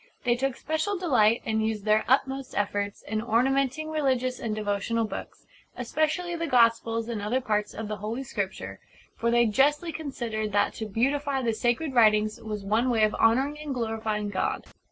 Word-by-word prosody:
They 240 -2 +3
took 265 0 -1
special 315 +9 -2
delight, 240 -10 +3
and 220 0 0
used 220 -2 -2
their 215 0 +3
utmost 270 0 +1
efforts, 205 0 -2
in 215 0 -2
ornamenting 270 +6 +1
religious 260 -4 0
and 220 -2 -3
devotional 215 +2 -1
books, 215 - -8 0.3
especially 310 +7 -1
the 335 0 -2
Gospels 230 -3 +3
and 230 -3 -3
other 220 +5 0
parts 210 -4 -1
of 220 - -5
the 210 0 -4
Holy 220 +6 -4
Scripture; 190 - -5 0.4
for 235 - 0
they 240 0 +4
justly 295 +9 +2
considered 235 -9 -4
that 205 - +2
to 220 - -5
beautify 270 +5 0
the 230 -2 +1
sacred 240 +6 0
writings 215 -3 +3
was 210 -2 -5
one 220 +6 +1
way 225 -3 +2
of 215 - +3
honouring 270 +6 +2
and 295 -3 -4
glorifying 220 -3 -2
God. 190 - -2
230 Hz, 175 wpm, -27 LUFS, 215-270 Hz, 0.4 s, they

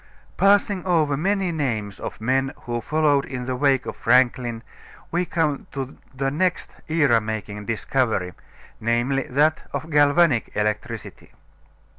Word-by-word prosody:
Passing 200 -1 +3
over 160 -6 +2
many 190 +4 0
names 115 - -2
of - - -6
men 130 +4 0
who 120 -1 -3
followed 150 -1 +2
in 125 -3 -5
the 130 0 -2
wake 135 -1 +2
of - - -5
Franklin 120 -1 +2 0.5
we 175 +2 +1
come 155 -5 -1
to 135 -1 -5 0.2
the 135 0 -2
next 180 +4 -1
era 145 -8 +3
making 105 -1 -5
discovery, 115 -5 0 0.5
namely, 120 +4 0
that 150 +4 +2
of 160 - -4
galvanic 145 -2 +4
electricity. 105 0 -3
135 Hz, 130 wpm, -23 LUFS, 120-155 Hz, 0.5 s, galvanic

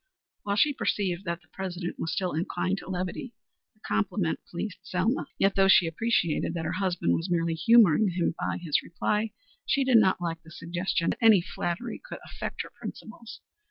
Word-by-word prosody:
While 200 0 -1
she 290 +8 +4
perceived 195 -7 -1
that 170 -1 -3
the - - -27
President 180 -2 -5
was 160 - -2
still 185 -2 -1
inclined 180 +4 -1
to - - -11
levity, 185 +6 -4 0.4
the 215 - -33
compliment 135 - -1
pleased 185 +3 -5
Selma. 200 +9 -1
Yet, 195 0 +3
though 195 0 +4
she 185 -2 +6
appreciated 170 -2 0
that 165 -1 -3
her 155 - -1
husband 180 - 0
was 165 - -1
merely 170 -1 +1
humoring 205 +1 +5
him 175 -1 0
by - - -1
his 165 -5 0
reply, 210 +5 -1 0.4
she 275 - +2
did 260 -3 +5
not 190 -4 +4
like 165 -2 -3
the 160 - -16
suggestion 175 +1 -1
that - - -5
any 220 -4 +7
flattery 175 +6 -4
could - - -7
affect - - -5
her - - -12
principles. 225 0 -9
185 Hz, 185 wpm, -28 LUFS, 170-210 Hz, 0.4 s, any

